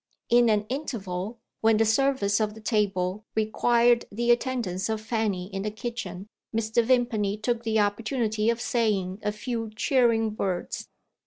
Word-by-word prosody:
In 240 -1 +6
an 210 -1 +2
interval, 220 -6 -4 0.2
when 225 -1 +4
the 225 - +3
service 225 -3 +2
of 215 -1 -1
the - - -10
table 205 -3 0
required 235 +2 +3
the 235 +3 +1
attendance 235 -6 0
of 220 -1 -1
Fanny 215 -4 -1
in 195 - -2
the 210 - -1
kitchen, 215 -3 -6 0.2
Mr. 225 +1 +1
Vimpany 225 -4 +1
took 235 +2 -1
the 220 -1 +1
opportunity 215 +1 0
of 235 0 +1
saying 205 -6 0
a 210 - 0
few 225 +1 -4
cheering 225 -3 +2
words. 185 -3 -3
220 Hz, 150 wpm, -26 LUFS, 205-235 Hz, 0.2 s, In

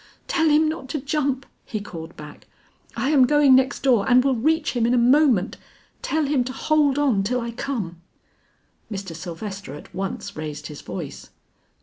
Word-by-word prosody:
"Tell 320 -2 +2
him 305 +1 +4
not 310 -4 -4
to 300 - -2
jump," 275 -1 -1 0.2
he 215 - -4
called 165 -4 -9
back. 150 0 -11 0.5
"I 260 +6 0
am 265 -4 +5
going 295 -2 +5
next 260 +1 +3
door 250 -5 +3
and 250 0 +6
will 270 - +3
reach 315 +8 +1
him 235 -2 +1
in 245 - +3
a - - +3
moment. 245 -4 +3 0.4
Tell 315 -1 0
him 275 -3 +1
to 255 - -4
hold 290 0 +2
on 270 -9 +2
till 245 +6 0
I 235 -1 -4
come." 210 -9 -4 0.9
Mr. 195 -5 -5
Sylvester 180 -1 -7
at 150 - -13
once 190 +1 -5
raised 150 -1 -6
his 150 -2 -8
voice. 170 -7 -7
250 Hz, 180 wpm, -23 LUFS, 195-285 Hz, 0.9 s, and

